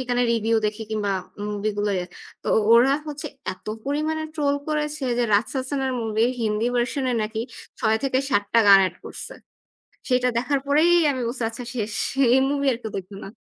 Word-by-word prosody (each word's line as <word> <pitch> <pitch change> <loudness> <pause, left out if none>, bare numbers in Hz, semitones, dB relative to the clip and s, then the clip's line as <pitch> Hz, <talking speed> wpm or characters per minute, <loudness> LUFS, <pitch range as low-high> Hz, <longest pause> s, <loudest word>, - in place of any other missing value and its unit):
সেখানে 245 -1 0
review 225 0 +1
দেখি 210 +1 -4
কিংবা 205 -2 -1 0.4
movie 210 +1 -2
গুলো। 205 0 +1 0.5
তো - - -13 0.3
ওরা 245 +4 +6 0.2
হচ্ছে 295 0 -5 0.3
এত 185 - -18 0.2
পরিমাণে 305 +3 -1
troll 285 -2 +1
করেছে 300 -1 -2 0.2
যে 240 - +3
রাসসাসান 265 +6 0
এর 260 - -1
movie 225 0 +1
র - - 0
হিন্দি 215 +1 0
version 255 +3 0
এ - - +1
নাকি 220 +1 -3 0.4
৬-৭ 255 -1 +1
টা - - +7
গান 195 -1 +10
add 175 - -16
করছে। - - -7 0.7
সেটা 250 0 +2
দেখার 270 +3 0
পরেই 305 +5 +4 0.2
আমি 260 -2 -2
বলছি 240 +1 -4
আচ্ছা 240 +2 -8
শেষ। 215 -2 -3 0.4
এই - - +6
movie 280 -1 0
আর 230 - -4
কেউ 220 - -5
দেখবে 195 +1 -7
না। - - -7
245 Hz, 180 wpm, -23 LUFS, 215-280 Hz, 0.7 s, গান